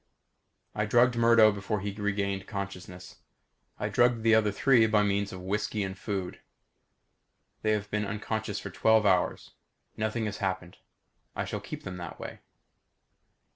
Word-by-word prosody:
I 105 0 -1
drugged 120 +2 +4
Murdo 115 -2 +6
before 100 +1 -3
he 100 +1 -3
regained 100 -2 -2
consciousness. 95 -3 -7 0.6
I - - -2
drugged 120 -2 +2
the 115 0 +5
other 110 -2 +4
three 115 +1 +4
by 105 -1 +3
means 100 0 0
of 95 - -7
whisky 105 +2 -1
and 95 -1 -4
food. 95 -2 -4 1.2
They 110 0 +2
have 105 -1 -3
been 105 -1 -1
unconscious 105 0 -3
for - - -7
twelve 110 -1 +3
hours. 95 -3 +1 0.4
Nothing 110 +1 -1
has 105 -3 -4
happened. 95 -2 -3 0.6
I - - -2
shall - - -4
keep - - -8
them 90 -1 -6
that 85 -2 -8
way. - - -7
105 Hz, 150 wpm, -29 LUFS, 100-110 Hz, 1.2 s, Murdo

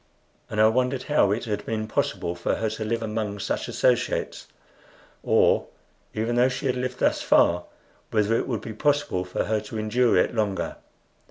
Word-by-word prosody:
And 105 - -3
I 110 - +7
wondered 125 +3 +1
how 145 -9 +3
it 110 +4 -1
had 105 -2 -3
been 110 -1 -3
possible 85 -4 -1
for 85 0 -1
her 110 -1 -2
to 110 0 -4
live 115 +1 -2
among 105 -2 -3
such 100 - -3
associates; - - 0 0.7
or, - - +3 0.5
even 115 +2 -1
though 125 +2 +5
she 125 - -5
had 130 -1 +1
lived 125 0 -3
thus - - +1
far, 85 +1 +3 0.4
whether 110 +1 +2
it - - -1
would 115 -6 -2
be 110 - -7
possible 145 -5 0
for 90 - -2
her 110 0 0
to 110 - -7
endure 115 +3 +2
it - - +2
longer. 100 -6 -1
110 Hz, 180 wpm, -25 LUFS, 105-125 Hz, 0.7 s, I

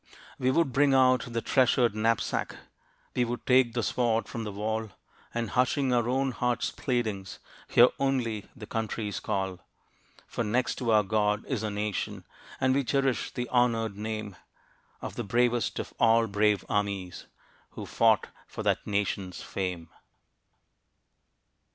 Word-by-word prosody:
We 130 - +2
would 135 -1 +2
bring 140 0 +4
out 130 -2 +4
the 115 -1 -2
treasured 125 -3 +3
knapsack, 115 +1 0 0.6
We 125 - +3
would 120 0 -4
take 125 -2 +4
the 120 -2 -1
sword 115 -1 +1
from 115 -2 -5
the 105 - -4
wall, 110 +2 -2 0.4
And 115 -2 -3
hushing 130 +1 +2
our 120 -1 +2
own 135 +1 +1
hearts' 125 0 -1
pleadings, 110 -7 -2 0.3
Hear 120 +1 +6
only 120 -6 -1
the 115 -5 -9
country's 110 -2 -3
call. 95 -2 -2 0.7
For 120 - -3
next 120 +4 0
to 125 -3 -2
our 110 -1 +5
God, 105 +1 0
is 125 -6 -2
our 110 - -1
Nation; 105 -1 -3 0.3
And 130 0 +3
we 140 +1 +2
cherish 135 0 0
the 125 0 -4
honored 115 -4 +1
name, 110 -2 -5 0.7
Of - - -5
the - - -2
bravest 120 +3 +1
of - - -5
all 115 0 +5
brave 105 -1 +1
armies 100 -3 -2 0.5
Who - - -6
fought 110 -5 +3 0.2
for - - -6
that - - 0
Nation's 100 -2 -2
fame. 90 -4 -4
115 Hz, 145 wpm, -28 LUFS, 105-125 Hz, 0.7 s, Hear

